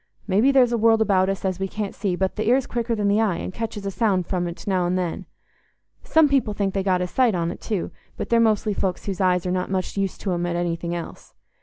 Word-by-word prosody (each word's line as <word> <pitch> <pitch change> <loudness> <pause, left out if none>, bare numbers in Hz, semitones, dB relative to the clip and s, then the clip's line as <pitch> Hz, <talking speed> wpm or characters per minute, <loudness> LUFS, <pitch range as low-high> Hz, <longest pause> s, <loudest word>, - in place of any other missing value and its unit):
Maybe 215 +7 +3
there's 255 -3 +4
a 235 - 0
world 225 0 +4
about 195 -3 +3
us 195 0 -3
as 185 -1 -1
we 195 - -1
can't 205 0 -4
see, 195 -3 -2
but 190 +1 -1
th' - - -10
ear's 245 +4 +2
quicker 235 -1 -2
than 205 -2 0
the 205 +2 +3
eye 205 -6 +1
and 185 - -5
catches 220 -2 -5
a 195 - -2
sound 195 -4 +1
from't 175 -2 -3
now 185 -3 +1
and 180 +1 0
then. 175 -3 -3 0.7
Some 320 -11 +4
people 265 -7 +1
think 195 -2 -1
they 195 - 0
get 185 -2 +1
a 180 - -1
sight 240 +1 +2
on't 170 0 -3
too, 205 -6 -3 0.3
but - - -4
they're 235 - +4
mostly 215 -2 +2
folks 190 -2 -2
whose 195 -2 -3
eyes 180 -1 +2
are 180 - -1
not 185 0 -1
much 190 +1 -2
use 195 -2 -1
to 195 - -3
'em 175 0 -1
at 175 - -2
anything 170 0 -2
else. 170 - -8
195 Hz, 255 wpm, -23 LUFS, 180-220 Hz, 0.7 s, there's